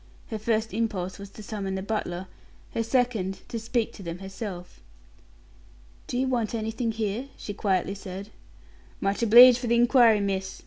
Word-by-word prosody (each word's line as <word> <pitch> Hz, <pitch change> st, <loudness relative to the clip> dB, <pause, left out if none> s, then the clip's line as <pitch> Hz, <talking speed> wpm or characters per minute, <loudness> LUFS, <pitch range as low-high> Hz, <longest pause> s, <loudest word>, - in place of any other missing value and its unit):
Her 220 Hz, -, -3 dB
first 220 Hz, 0 st, 0 dB
impulse 200 Hz, -4 st, -2 dB
was 200 Hz, 0 st, -8 dB
to 215 Hz, -, -12 dB
summon 200 Hz, -2 st, -4 dB
the 190 Hz, -, -3 dB
butler; 190 Hz, -4 st, -3 dB, 0.5 s
her -, -, -1 dB
second, 230 Hz, -5 st, 0 dB
to 230 Hz, -, -3 dB
speak 230 Hz, 0 st, -1 dB
to -, -, -11 dB
them 170 Hz, -2 st, -5 dB
herself. 190 Hz, -1 st, -8 dB, 1.3 s
"Do 245 Hz, -, -3 dB
you 260 Hz, -, +1 dB
want 235 Hz, -3 st, -1 dB
anything 225 Hz, +1 st, -2 dB
here?" 220 Hz, +3 st, -3 dB
she 205 Hz, -, -6 dB
quietly 195 Hz, -2 st, 0 dB
said. 200 Hz, +1 st, -8 dB, 0.7 s
"Much 195 Hz, +2 st, -1 dB
obleeged 240 Hz, +2 st, +9 dB
for 245 Hz, -, -4 dB
the 235 Hz, -, +3 dB
inquiry, 235 Hz, -2 st, +5 dB
miss. 195 Hz, -1 st, -2 dB
215 Hz, 165 wpm, -26 LUFS, 195-230 Hz, 1.3 s, obleeged